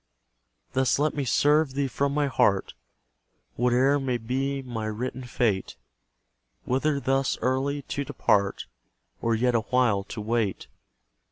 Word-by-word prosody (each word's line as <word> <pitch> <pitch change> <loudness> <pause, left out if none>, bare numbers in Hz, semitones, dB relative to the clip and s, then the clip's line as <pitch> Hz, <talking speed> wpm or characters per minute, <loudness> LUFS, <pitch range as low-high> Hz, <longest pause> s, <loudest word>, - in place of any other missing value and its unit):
Thus 130 0 +2
let 150 +2 +1
me 145 -2 -2
serve 145 +2 +3
Thee 140 0 +1
from 140 +2 -1
my 150 -1 +2
heart, 100 -7 +1 0.8
Whate'er 125 +4 +3
may 130 -3 -1
be 135 +4 -2
my 115 -4 -4
written 125 +4 -4
fate: 110 -6 -1 0.9
Whether 140 +3 +1
thus 135 +1 0
early 135 +2 -1
to 140 +2 -3
depart, 100 -6 0 0.6
Or 115 0 +1
yet 125 +2 +1
a 115 - +2
while 115 -4 +1
to 110 - -7
wait. 110 -2 -1
130 Hz, 135 wpm, -26 LUFS, 115-140 Hz, 0.9 s, serve